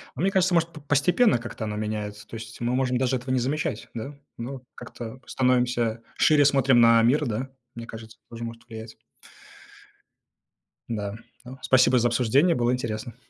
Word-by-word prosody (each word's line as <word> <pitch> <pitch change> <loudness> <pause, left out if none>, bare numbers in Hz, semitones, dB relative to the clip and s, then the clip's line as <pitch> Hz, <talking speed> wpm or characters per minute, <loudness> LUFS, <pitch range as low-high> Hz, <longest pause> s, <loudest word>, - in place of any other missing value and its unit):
А 130 - -6
мне 195 - +2
кажется, 185 -2 +2
может, 165 0 +3
п 155 - -11
постепенно 175 - +3
как-то 115 -1 -7
оно 105 -1 -4
меняется. 105 -1 -4
То - - -12
есть 110 0 -9
мы 120 +1 0
можем 125 -1 +1
даже 130 0 +1
этого 125 +1 -6
не 130 - +2
замечать, 135 -3 -2
да? 135 +5 -6 0.2
Ну, 130 +2 -6
как-то 120 +2 -9
становимся 125 -3 +1
шире, 150 -2 +5
смотрим 135 -3 +4
на 115 0 +6
мир, 140 +5 +3
да? 120 +4 -3 0.3
Мне 115 0 -8
кажется, 110 -1 -11
тоже 115 0 -7
может 115 0 -8
влиять. 110 0 -9 1.9
Да, 105 -3 -3 0.3
ну, 130 +2 -10
спасибо 130 -1 +4
за 120 - +3
обсуждение, 130 +8 +3
было 120 0 +1
интересно. 115 -2 -4
120 Hz, 170 wpm, -25 LUFS, 115-135 Hz, 1.9 s, на